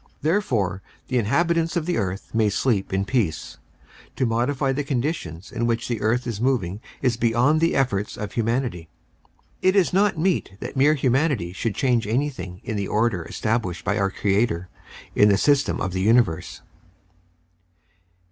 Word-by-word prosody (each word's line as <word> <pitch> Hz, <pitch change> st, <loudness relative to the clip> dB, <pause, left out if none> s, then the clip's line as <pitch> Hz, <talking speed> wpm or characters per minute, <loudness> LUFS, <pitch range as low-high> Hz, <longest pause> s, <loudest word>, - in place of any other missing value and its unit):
Therefore 120 Hz, -, 0 dB, 0.3 s
the 125 Hz, -, +2 dB
inhabitants 165 Hz, -, +1 dB
of 170 Hz, -3 st, 0 dB
the 175 Hz, -6 st, 0 dB
earth 95 Hz, -1 st, -4 dB
may 110 Hz, -2 st, +3 dB
sleep 105 Hz, -1 st, 0 dB
in 95 Hz, +1 st, 0 dB
peace. 105 Hz, -9 st, -2 dB, 0.6 s
To 130 Hz, -, 0 dB
modify 125 Hz, +4 st, 0 dB
the 145 Hz, +2 st, -1 dB
conditions 125 Hz, -, -3 dB
in 120 Hz, +1 st, -1 dB
which 115 Hz, 0 st, -1 dB
the 120 Hz, -2 st, -3 dB
earth 120 Hz, +4 st, +1 dB
is 115 Hz, -3 st, -4 dB
moving 110 Hz, -7 st, 0 dB, 0.2 s
is 125 Hz, -3 st, +2 dB
beyond 120 Hz, +7 st, +2 dB
the 165 Hz, -, +2 dB
efforts 105 Hz, -7 st, 0 dB
of 105 Hz, -1 st, -5 dB
humanity. 115 Hz, -8 st, -2 dB, 0.7 s
It 185 Hz, +1 st, +3 dB
is 190 Hz, -3 st, +3 dB
not 195 Hz, -1 st, +3 dB
meet 170 Hz, -, 0 dB
that -, -, -6 dB
mere 145 Hz, +3 st, +4 dB
humanity 130 Hz, -, +1 dB
should 105 Hz, +3 st, -2 dB
change 120 Hz, -5 st, +1 dB
anything 110 Hz, -7 st, -2 dB
in 110 Hz, -4 st, -3 dB
the 100 Hz, -1 st, -2 dB
order 105 Hz, -4 st, +1 dB
established 105 Hz, -5 st, -2 dB
by 100 Hz, +2 st, 0 dB
our 100 Hz, -1 st, +2 dB
Creator 95 Hz, -3 st, 0 dB, 0.4 s
in 105 Hz, -, +5 dB
the 100 Hz, -, +4 dB
system 145 Hz, +6 st, +2 dB
of 95 Hz, -2 st, -2 dB
the 95 Hz, -, -1 dB
universe. 110 Hz, -5 st, +1 dB
115 Hz, 160 wpm, -23 LUFS, 100-135 Hz, 0.7 s, in